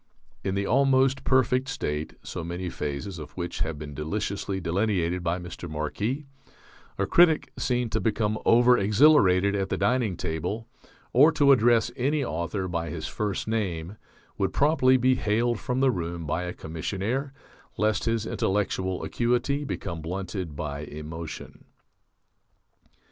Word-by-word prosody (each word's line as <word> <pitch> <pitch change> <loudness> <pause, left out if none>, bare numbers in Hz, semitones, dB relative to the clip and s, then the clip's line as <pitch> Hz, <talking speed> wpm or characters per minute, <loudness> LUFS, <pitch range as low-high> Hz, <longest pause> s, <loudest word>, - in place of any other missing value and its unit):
In 95 - -1
the 100 0 0
Almost 135 +2 +3
Perfect 130 0 +2
State 75 - -3
(so 85 - -5
many 90 +1 -4
phases 75 +5 -4
of 75 -1 -9
which 85 -1 -4
have 80 -2 -2
been 75 -1 -7
deliciously 95 +5 -3
delineated 90 -1 0
by 85 +1 0
Mr. 90 -1 -8
Marquis) 100 - -3 0.7
a - - +1
critic 170 -3 +4
seen 125 -3 0
to 110 - +1
become 110 -1 0
over 120 +1 +6
exhilarated 100 -4 +5
at 95 -1 -1
the - - -1
dining 105 -2 +1
table 90 +8 -3 0.5
or 145 +6 +7
to 145 -3 +5
address 120 -2 +4
any 140 +3 0
author 90 +2 -3
by 85 -2 -3
his 80 0 -5
first 100 +2 -3
name 95 -5 -2 0.4
would 95 -1 0
promptly 140 -3 +4
be 130 +1 +3
haled 120 -1 0
from 125 +1 -2
the 135 -1 +4
room 85 -4 -4
by 85 +4 -1
a 90 - -4
commissionaire 100 - -3 0.5
lest 110 0 +1
his 115 -1 0
intellectual 95 -2 -1
acuity 125 +4 0
become 90 - -4
blunted 90 -1 -4
by 70 -1 -4
emotion. 75 +2 -8
100 Hz, 145 wpm, -26 LUFS, 85-125 Hz, 0.7 s, or